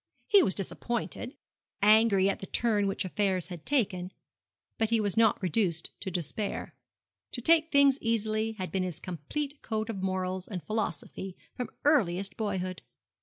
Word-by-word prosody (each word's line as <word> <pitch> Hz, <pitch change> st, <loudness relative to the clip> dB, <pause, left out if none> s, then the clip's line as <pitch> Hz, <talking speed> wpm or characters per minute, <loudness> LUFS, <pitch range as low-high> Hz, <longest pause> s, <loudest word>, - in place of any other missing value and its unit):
He 405 Hz, -2 st, +6 dB
was 190 Hz, -, +2 dB
disappointed 235 Hz, +5 st, -3 dB, 0.5 s
angry 210 Hz, -2 st, +5 dB
at 200 Hz, -, 0 dB
the 195 Hz, -, -7 dB
turn 210 Hz, -2 st, +1 dB
which 195 Hz, 0 st, -1 dB
affairs 185 Hz, -2 st, 0 dB
had 175 Hz, -4 st, -9 dB
taken; 195 Hz, -10 st, 0 dB, 0.7 s
but 225 Hz, -1 st, +2 dB
he 230 Hz, -1 st, +3 dB
was 205 Hz, -2 st, 0 dB
not 225 Hz, -2 st, +4 dB
reduced 180 Hz, -3 st, 0 dB
to 195 Hz, -, -4 dB
despair. 185 Hz, +4 st, -3 dB, 0.6 s
To -, -, -2 dB
take 320 Hz, +5 st, +4 dB
things 280 Hz, -1 st, +5 dB
easily 220 Hz, -1 st, 0 dB
had 185 Hz, -4 st, -5 dB
been 190 Hz, -, 0 dB
his 180 Hz, -4 st, -3 dB
complete 275 Hz, -, -4 dB
code 220 Hz, 0 st, -2 dB
of 195 Hz, -4 st, -6 dB
morals 185 Hz, -1 st, -2 dB
and 185 Hz, -5 st, -5 dB
philosophy 195 Hz, -3 st, -3 dB, 0.2 s
from 250 Hz, -, -4 dB, 0.2 s
earliest 195 Hz, -, +3 dB
boyhood. 185 Hz, -4 st, -3 dB
205 Hz, 155 wpm, -29 LUFS, 185-230 Hz, 0.7 s, He